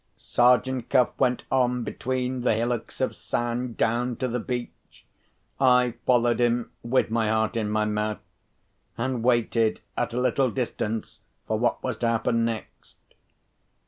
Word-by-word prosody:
Sergeant 125 0 +2
Cuff 125 - +4
went 125 -2 +2
on 125 -2 +2
between 130 +1 -2
the 120 - +2
hillocks 120 +1 -2
of - - 0
sand, 120 0 -3
down 120 +2 +1
to 130 - -2
the 125 0 -2
beach. 120 0 -6 0.5
I 125 -2 +4
followed 120 -1 +3
him 120 -1 +1
(with 120 -1 +1
my 115 -1 +1
heart 110 +1 +1
in 110 -2 -1
my 105 0 +1
mouth); 105 0 -1 0.8
and 125 0 -1
waited 115 -2 +2 0.2
at - - -1
a 125 - -1
little 130 +1 +2
distance 115 -2 -3 0.3
for 110 -1 -1
what 120 - 0
was 130 -4 -2
to 120 - 0
happen 115 0 +1
next. 115 -1 -5
120 Hz, 145 wpm, -26 LUFS, 115-125 Hz, 0.8 s, Cuff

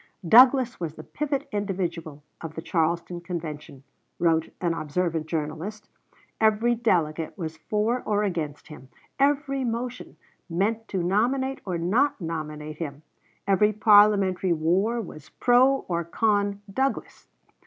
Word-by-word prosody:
"Douglas 250 - +6
was 165 -3 -4
the - - -10
pivot 290 -2 -3
individual 175 -7 -3 0.2
of 160 -1 -7
the 160 - -5
Charleston 170 +1 -1
Convention," 155 -6 -7 0.3
wrote 165 -2 +1
an 170 -2 0
observant 165 0 -2
journalist; 165 +7 -4 0.5
"every 220 +2 +3
delegate 170 -8 0
was 160 -3 -5
for 215 +8 -1
or 210 -1 0
against 160 -7 -4
him; 135 -4 -12 0.3
every 275 -1 +1
motion 245 +1 -4 0.3
meant 215 +6 -1
to 185 -3 -2
nominate 255 +9 0
or 180 -3 -2
not 225 +13 +1
nominate 155 -3 -5
him; 150 -2 -6 0.4
every 200 +2 +3
parliamentary 205 -3 +4
war 185 +9 +1
was 155 -9 -9
pro 255 +2 +3
or 170 -1 -1
con 205 +2 0
Douglas." 270 +4 -2
190 Hz, 125 wpm, -25 LUFS, 165-225 Hz, 0.5 s, Douglas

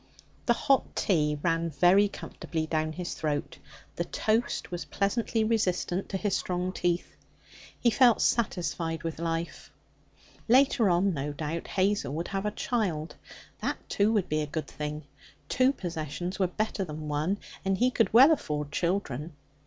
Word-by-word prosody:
The 240 - +6
hot 270 +2 +1
tea 150 -6 +1
ran 165 -1 +1
very 180 +7 +5
comfortably 165 -4 -5
down 155 0 -1
his 175 +1 -4
throat; 150 -2 -3 0.4
the - - 0
toast 220 -2 -1
was 175 -1 -4
pleasantly 220 +2 0
resistant 195 -4 0
to 195 - -1
his 200 0 0
strong 180 0 -2
teeth. 175 -1 -1 0.6
He 235 - +3
felt 240 0 +5
satisfied 170 -7 0
with 165 -1 -4
life. 165 0 -3 0.8
Later 250 -3 +5
on, 180 +2 +3
no 145 0 -3
doubt, 155 +3 -4
Hazel 195 -6 0
would 165 +2 -3
have 195 +1 -2
a 210 - -4
child. 175 -10 -1 0.5
That, - - -1
too, 205 +2 +2
would 205 -5 +1
be 155 0 0
a 150 - -2
good 155 0 -3
thing. 150 +1 -5 0.4
Two 255 - +3
possessions 175 - -5
are 190 - +3
better 210 +2 -2
than 155 -3 -6
one, 150 +7 0 0.3
and 195 -1 +1
he 250 +4 +3
could 225 - +2
well 260 +7 +8
afford 150 - -1
children. 170 -4 -2
180 Hz, 155 wpm, -28 LUFS, 155-210 Hz, 0.8 s, well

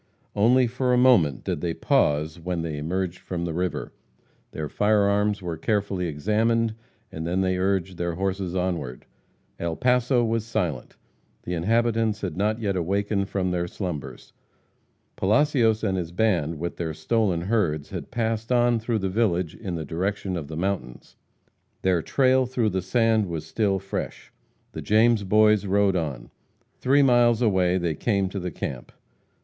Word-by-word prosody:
Only 125 +5 +4
for 125 +1 0
a - - +4
moment 105 - +4
did - - -3
they 85 -2 -2
pause 75 +3 +1
when 85 0 -3
they 80 -3 -4
emerged 90 +3 -2
from 85 -2 -4
the 85 - -3
river. 90 +2 -3 0.6
Their 75 -1 -5
fire 105 +5 +2
arms 100 0 +1
were 85 -2 -4
carefully 100 -1 -1
examined, 110 +8 +1 0.4
and 80 +1 -5
then 90 +2 0
they 95 -1 0
urged 95 -1 0
their 85 -1 -2
horses 95 0 -2
onward. 85 -9 -3 0.5
El 85 -1 -2
Paso 125 - +2
was 115 -1 0
silent. 90 - -3 0.5
The 90 - -4
inhabitants 110 +4 +1
had 90 -6 -3
not 105 +4 0
yet 100 -4 -1
awakened 100 +3 -1
from 95 -2 -1
their 90 -1 -1
slumbers. 85 -6 -6 0.8
Palacios 115 0 +2
and 95 -3 0
his 85 -2 -5
band, 85 -6 0
with 85 +3 -4
their 80 -3 -3
stolen 105 -4 0
herds, 85 -7 -1
had 90 -3 -6
passed 115 -1 -2
on 120 -1 +3
through 115 +1 -1
the 95 -2 -1
village 95 -5 0
in 95 -6 -5
the 80 -2 -4
direction 95 +4 -2
of 80 -5 -5
the 80 +1 -7
mountains. 90 -9 -4 0.7
Their 90 -3 +2
trail 130 - +2
through 120 -3 0
the 95 -1 -1
sand 110 +2 +2
was 80 -3 -5
still 100 +3 0
fresh. 95 +1 -6 0.4
The - - -6
James 110 0 +3
Boys 105 +1 +4
rode 100 0 +2
on. 70 -8 -3 0.5
Three 140 +2 +4
miles 120 -2 +4
away 95 -4 +2
they 85 -3 -1
came 100 +3 0
to 100 - -4
the 90 0 -3
camp. 65 -5 -6
95 Hz, 165 wpm, -25 LUFS, 85-110 Hz, 0.8 s, Only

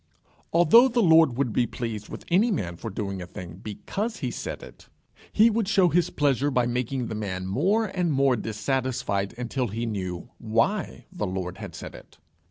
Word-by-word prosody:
Although 175 +10 +7
the 240 -2 +1
Lord 160 -7 +5
would 130 -5 0
be 120 - +2
pleased 110 -4 -5
with - - -8
any 200 +8 +4
man 95 - -2
for 110 - -6
doing 100 -2 -4
a 90 - -7
thing 90 -2 -9
because 205 - -4
he - - -3
said - - -6
it, - - -14 0.4
he 225 +2 +5
would 220 -2 0
show 190 -4 +4
his 175 +1 +2
pleasure 145 -1 +1
by 125 -3 +2
making 125 +1 -1
the 115 - -5
man 95 -4 -4
more 185 - +1
and 180 -4 -1
more 135 -2 +3
dissatisfied 110 -2 -2
until 125 +1 -2
he 115 +3 -3
knew 95 -5 -4
why 115 - 0
the 180 - -3
Lord 90 -1 -4
had - - -8
said - - -8
it. - - -14
125 Hz, 185 wpm, -26 LUFS, 105-175 Hz, 0.4 s, Although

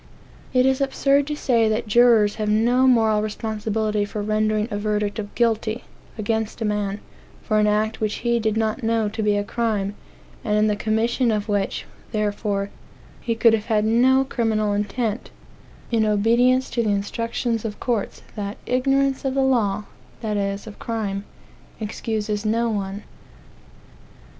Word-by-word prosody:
It 255 -1 +3
is 265 +1 +2
absurd 275 +1 +2
to 300 - -2
say 235 -6 +2
that 220 +2 0
jurors 225 -2 +5
have 210 - 0
no 240 +5 +3
moral 220 -4 +4
responsibility 215 0 -1
for 205 0 -4
rendering 215 0 +1
a 205 - -1
verdict 210 0 -1
of 205 -1 -6
"guilty" 230 0 0 0.3
against 220 +1 -2
a 225 - -1
man, 205 -1 -1 0.4
for 215 -1 +1
an 210 - +3
act 215 +1 0
which 215 -1 0
he 235 0 +2
did 220 -1 0
not 220 +3 0
know 225 -2 +1
to 220 +1 -4
be 210 -1 +2
a 205 - 0
crime, 205 -2 -1 0.5
and 210 -3 +1
in 210 - +4
the 210 -1 +2
commission 225 +4 +1
of 210 -1 0
which, 205 -2 -1 0.3
therefore, 205 -1 -1 0.5
he 230 - -2
could 225 0 +5
have 215 -1 0
had 215 -2 +2
no 255 +4 +4
criminal 220 -5 0
intent, 210 +3 -2 0.6
in 225 -2 +3
obedience 235 +5 +3
to 235 - 0
the 220 - 0
instructions 230 +3 -1
of 215 -2 -5
courts 235 -5 -2
that 205 0 -4
"ignorance 270 +1 +1
of 270 -1 -1
the 270 - +3
law 215 -6 +1 0.4
(that 215 -2 -2
is, 200 0 -2
of 215 -2 -11
crime) 205 -3 -3 0.5
excuses 215 -1 -3
no 230 +2 +1
one." 200 0 -3
220 Hz, 160 wpm, -23 LUFS, 210-235 Hz, 0.6 s, jurors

